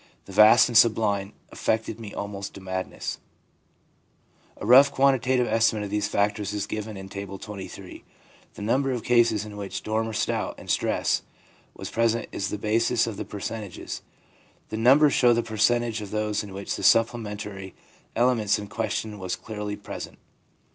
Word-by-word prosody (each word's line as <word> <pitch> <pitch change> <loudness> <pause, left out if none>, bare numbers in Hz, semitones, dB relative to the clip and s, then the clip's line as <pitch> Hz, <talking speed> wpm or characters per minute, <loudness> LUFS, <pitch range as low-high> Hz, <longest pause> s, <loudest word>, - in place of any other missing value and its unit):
The - - -11
vast 105 +4 +7
and 120 - -5
sublime 105 -3 +3 0.2
affected 110 0 -1
me 110 -3 -8
almost 100 -1 -6
to - - -8
madness/ 95 -1 -4 1.4
A - - -7
rough 135 +5 +7
quantitative 130 -2 +2
estimate 110 -2 +2
of 100 - -6
these 105 0 0
factors 105 0 0
is 105 -1 -2
given 110 -1 -5
in 95 0 -8
Table 100 0 -7
XXIII. 100 -2 -9 0.5
The - - -9
number 135 +5 +1
of 120 - -4
cases 115 -3 +3
in 105 -1 -9
which 100 -1 -5
doubt 110 +1 -1
or 110 - -5
storm - - -1
and - - -5
stress - - +1 0.5
was - - -7
present 115 0 +1
is 100 - -3
the 105 - -3
basis 115 +3 +1
of 115 - -4
the - - -5
percentages. 105 -1 -6 0.7
The 110 - -4
numbers 135 +6 +5
show 120 -1 +5
the 120 0 +1
percentage 115 +1 +1
of 105 - -7
those 105 0 -1
in 100 - -9
which 100 +1 -4
the - - -6
supplementary 105 -4 +1 0.4
elements 115 -4 +2
in 105 -1 -7
question 110 -1 -3
were 95 - -6
clearly 105 +3 -4
present. 105 0 -8
105 Hz, 165 wpm, -25 LUFS, 100-115 Hz, 1.4 s, vast